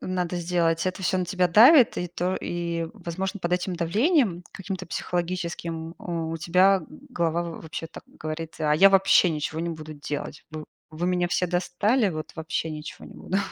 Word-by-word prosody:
надо 180 -1 -2
сделать, 170 -1 0
это 185 +1 -3
всё 185 0 +1
на 180 - 0
тебя 180 0 +1
давит 245 - +7
и 180 - -3
то, 180 +2 -2
и, 170 -1 -3
возможно, 190 +1 -4
под 175 0 -2
этим 180 0 -1
давлением 205 - +2
каким-то 190 -2 -6
психологическим, 170 -2 -3
а, - - -8 0.2
у 165 0 -3
тебя 185 +4 +3 0.3
голова 170 -6 0
в 170 -1 -7
вообще 160 +1 -6
так - - -12 0.2
говорит: 155 +1 -5
"А 150 -1 +2
я 195 +6 +7
вообще 195 -2 +5
ничего 155 +1 -3
не 170 - -2
буду 155 -1 -8
делать. 145 0 -6
Вы 155 -1 -7 0.3
вы 165 +3 -3
меня 180 -1 +1
все 180 +1 0
достали, 190 +6 +1
вот 155 -2 -6
вообще 160 0 -3
ничего 150 0 -8
не - - -14
буду". 190 - -2
175 Hz, 180 wpm, -25 LUFS, 165-185 Hz, 0.3 s, давит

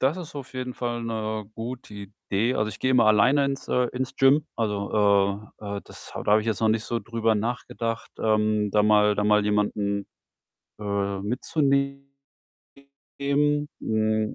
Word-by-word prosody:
Das 135 +6 +2
ist 170 -3 -8
auf 135 -2 -8
jeden 125 -1 -4
Fall 120 -1 -3
'ne 110 -1 -3
gute 120 0 -7
Idee. 105 +3 -2
Also, 105 0 0
ich 95 -3 -8
gehe 130 - 0
immer 120 -4 +5
alleine 115 +7 +5
ins 140 0 -3
äh, 125 0 +2
ins 130 +1 -3
Gym. 140 +3 +4
Also, 100 -1 +1
äh 100 -1 -5
äh, - - -7
das - - -12
ha - - -4
da 105 - +2
habe 105 - +6
ich 110 - -7
jetzt 110 -3 -1
noch 110 - +3
nicht 110 0 +1
so 120 -1 -2
drüber 115 -1 0
nachgedacht, 115 0 -3
ähm, 110 -1 +2
da 105 +1 +3
mal 105 -1 +4
da 105 - 0
mal 105 0 +4
jemanden, 105 -1 0 0.7
äh, 100 -1 -2
mitzunehmen. 140 +5 0 1.8
Hm, 110 0 0
110 Hz, 165 wpm, -25 LUFS, 105-125 Hz, 1.8 s, habe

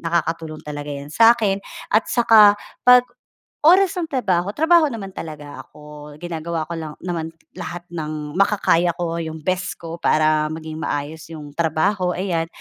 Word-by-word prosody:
nakakatulong 165 -2 -2
talaga 145 -1 -7
'yan 140 +1 -8
sa 225 +7 +6
akin 205 -4 0 0.3
at 215 - +3
saka 220 -4 +6 0.3
'pag, 250 0 +8 0.6
oras 375 +2 +5
ng 335 - -1
trabaho, 200 - -1
trabaho 325 +1 +4
naman 220 -8 -5
talaga 150 -5 -8
ako. 150 0 -12
Ginagawa 165 -1 -4
ko 170 - -3
lang 155 -2 -6
naman 165 -2 -4 0.2
lahat 175 0 -6
ng 155 -1 -5
makakaya 180 -4 +2
ko, 170 -1 -3
yung 160 -1 -6
best 185 +2 -2
ko, 165 0 -8
para 155 -1 +2
maging 160 0 -7
maayos 155 +1 -4
'yong 150 -2 -9
trabaho 180 +3 0
ayan. 175 -3 -1
170 Hz, 150 wpm, -21 LUFS, 155-200 Hz, 0.6 s, pag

